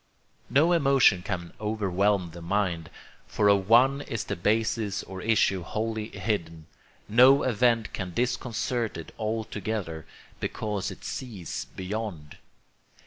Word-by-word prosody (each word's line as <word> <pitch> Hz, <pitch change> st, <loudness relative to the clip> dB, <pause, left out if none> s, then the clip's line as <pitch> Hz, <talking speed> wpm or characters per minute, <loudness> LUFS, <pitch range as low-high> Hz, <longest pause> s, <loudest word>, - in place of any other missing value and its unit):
No 150 Hz, +7 st, +4 dB
emotion 135 Hz, -, +4 dB
can 85 Hz, -1 st, -5 dB
overwhelm 100 Hz, -3 st, 0 dB
the 85 Hz, +1 st, -10 dB
mind, 85 Hz, -2 st, -1 dB, 0.4 s
for 105 Hz, -, +1 dB
of 100 Hz, -1 st, +2 dB
none 135 Hz, +4 st, +5 dB
is 115 Hz, -6 st, -4 dB
the -, -, -3 dB
basis 110 Hz, +2 st, 0 dB
or 95 Hz, -1 st, -8 dB
issue 105 Hz, -3 st, +2 dB
wholly 110 Hz, +4 st, -3 dB
hidden; 90 Hz, -6 st, -3 dB, 0.4 s
no 130 Hz, +6 st, +6 dB
event 115 Hz, -2 st, +2 dB
can 95 Hz, -3 st, -4 dB
disconcert 120 Hz, -1 st, -1 dB
it 85 Hz, -, -9 dB
altogether, 110 Hz, -6 st, -3 dB, 0.3 s
because 105 Hz, -3 st, -3 dB
it -, -, -10 dB
sees 105 Hz, -, -5 dB
beyond. 95 Hz, -5 st, -5 dB
105 Hz, 120 wpm, -27 LUFS, 90-115 Hz, 0.4 s, no